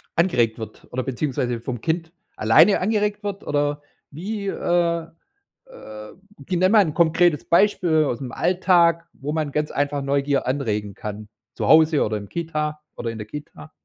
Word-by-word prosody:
angeregt 120 -11 +2
wird 110 - -9
oder 130 - -2
beziehungsweise 125 -3 -2
vom 120 -2 -5
Kind 165 0 -2 0.2
alleine 135 - +5
angeregt 210 +1 0
wird? 200 -1 -4
Oder 145 0 -1 0.3
wie, 200 +6 -5
äh 170 -3 0 0.6
äh, 105 - -11 0.3
gi 180 -2 -1
nenn 185 +2 +3
mal 215 - +7
'n 155 - -3
konkretes 170 -2 +3
Beispiel 170 -4 +3
aus'm 125 0 -3
Alltag, 175 -1 +2
wo 145 +2 -5
man 155 -2 -2
ganz 150 0 -1
einfach 145 0 -1
Neugier 140 0 0
anregen 105 -7 -2
kann 105 0 -7 0.2
zu - - -3
Hause 160 -1 +5
oder 110 0 -1
im 100 -1 -8
Kita 155 -2 -3 0.2
oder 115 - -3
in 115 - -8
der 105 - -7
Kita? 125 - -10
150 Hz, 160 wpm, -22 LUFS, 125-170 Hz, 0.6 s, mal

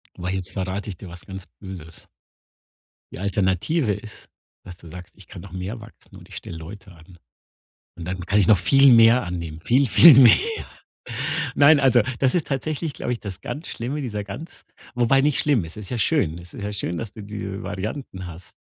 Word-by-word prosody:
Aber 90 +1 -4
jetzt 95 -1 -4
verrate 95 +2 -4
ich 95 - -7
dir 90 +1 -10
was 85 0 -12
ganz 95 -1 -9
Böses. 90 -5 -10 1.1
Die - - -8
Alternative 100 - 0
ist, 105 +2 -10 0.4
dass 90 - -9
du 85 - -14
sagst: 90 +1 -11
„Ich 100 -4 -17
kann 90 - -10
noch 95 0 -12
mehr 95 +6 -5
wachsen 110 - -15
und - - -15
ich - - -13
stelle 85 - -7
Leute 95 +5 -11
an. 85 +1 -17 0.8
Und 85 - -8
dann 90 0 -4
kann 100 - +2
ich 90 - +3
noch 105 - +6
viel 135 +6 +5
mehr 115 +2 +6
annehmen, 85 -3 -6
viel, 130 +9 +2
viel 135 - +8
mehr.“ 125 -3 +9 1.2
Nein, 145 +1 +6
also, 130 -3 +5 0.2
das 135 +3 +2
ist 175 - 0
tatsächlich, 150 +2 -3
glaube 125 - -3
ich, 120 - -4
das 95 -2 -7
ganz 155 +3 -6
Schlimme, 130 +6 -4
dieser 105 -5 -4
ganz 125 +12 -10 0.3
wobei 125 +2 +3
nicht 145 0 +1
schlimm, 135 - +2
es 80 - -11
ist 105 -3 -9
ja 125 - -2
schön. 85 -5 +1
Es 85 -1 -13
ist - - -8
ja 105 - -3
schön, 85 -4 -3
dass 110 -2 -6
du 110 - -9
diese 100 -1 -6
Varianten 95 -1 -6
hast. 85 +1 -11
100 Hz, 205 wpm, -23 LUFS, 90-125 Hz, 1.2 s, mehr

